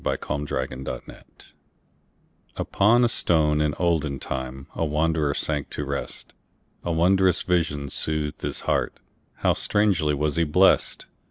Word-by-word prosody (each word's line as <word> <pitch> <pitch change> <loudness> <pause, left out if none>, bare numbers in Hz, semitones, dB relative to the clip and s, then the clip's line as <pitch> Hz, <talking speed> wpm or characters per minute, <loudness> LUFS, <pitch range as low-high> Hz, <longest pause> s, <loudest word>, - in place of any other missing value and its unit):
Isaacs - - -2
Pillow 70 -2 -2
and 65 +1 -8
Stone - - -7 1.4
UPON 115 +5 +3
a - - +4
stone 75 -8 +2
in 75 -1 0
olden 80 -5 0
timeA 65 +4 -5
wanderer 75 -1 +1
sank 75 -3 -2
to 75 - -4
rest.A 70 +4 -7
wondrous 90 +2 +3
vision 80 -5 0
soothed 75 +1 -2
his - - -3
heartHow - - -2
strangely 95 -8 +1
was 75 +2 -1
he 85 - +3
blessed! 90 +5 +3
75 Hz, 120 wpm, -24 LUFS, 70-85 Hz, 1.4 s, a